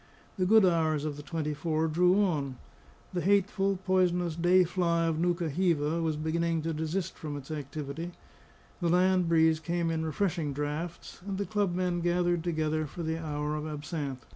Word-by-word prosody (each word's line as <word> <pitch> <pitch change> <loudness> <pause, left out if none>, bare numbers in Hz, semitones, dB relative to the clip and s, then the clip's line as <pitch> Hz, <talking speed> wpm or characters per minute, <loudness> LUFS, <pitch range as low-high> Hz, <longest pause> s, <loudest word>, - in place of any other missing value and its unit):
The 185 - +2
good 220 0 +6
hours 160 -4 +2
of 150 -2 -3
the 145 - -8
twenty 150 0 -3
four 155 +1 0
drew 180 +5 +4
on; 140 -8 -1 0.6
the 175 - -1
hateful, 195 0 +2
poisonous 180 -3 +2
day 175 +2 +4
fly 170 -1 +1
of 160 -1 0
Nukahiva, 170 -2 +1
was 160 -2 0
beginning 165 +1 0
to 165 0 -1
desist 160 +4 -2
from 150 -3 -5
its 140 +1 -9
activity; 150 +3 -5 0.7
the 175 -3 0
land 180 0 +3
breeze 160 -1 +4
came 170 0 -1
in 160 0 -1
refreshing 160 -2 -1
draughts; 150 +6 -5
and 195 -1 -4
the 200 - -1
club 205 -4 0
men 180 -1 0
gathered 175 -1 +1
together 155 -2 -1
for 170 +4 -7
the 160 0 -2
hour 150 -1 -2
of 155 0 -4
absinthe. 150 -4 -5
165 Hz, 170 wpm, -29 LUFS, 155-180 Hz, 0.7 s, good